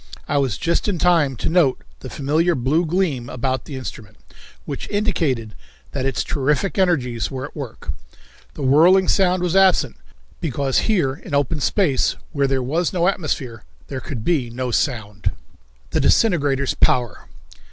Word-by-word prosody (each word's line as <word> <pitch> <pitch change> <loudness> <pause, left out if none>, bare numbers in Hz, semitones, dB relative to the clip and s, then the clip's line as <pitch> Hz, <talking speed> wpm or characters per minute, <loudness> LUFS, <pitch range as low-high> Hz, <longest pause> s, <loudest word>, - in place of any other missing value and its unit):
I 145 - +1
was 130 -7 0
just 170 +3 0
in 200 -4 0
time 165 -6 +3
to - - -3
note 160 -6 +2 0.2
the - - -8
familiar 155 +5 +1
blue 150 +7 +1
gleam 155 -9 -1
about 130 0 -2
the 145 - -7
instrument, 110 - -8 0.5
which 140 - -6
indicated 160 - -1 0.4
that 135 -1 -2
its 135 - -1
terrific 150 +6 0
energies 130 -11 +1
were 130 -1 -5
at 145 - -12
work. 140 -7 -6 0.6
The - - -5
whirring 170 +8 +5
sound 185 -2 +2
was 180 0 0
absent, 185 - +4 0.4
because 140 -4 0
here, 175 -11 +2
in 150 +1 -6
open 145 +2 0
space, 155 -3 +1 0.2
where 140 -1 +1
there 135 -1 0
was 160 +7 0
no 175 -1 +1
atmosphere, 140 - -2 0.3
there 130 -1 -4
could 120 -5 -6
be 145 -9 +1
no 125 +1 -3
sound. 110 -7 -1 0.6
The - - +1
Disintegrator's 145 - +2
Power. 120 -3 +1
140 Hz, 155 wpm, -21 LUFS, 130-175 Hz, 0.6 s, whirring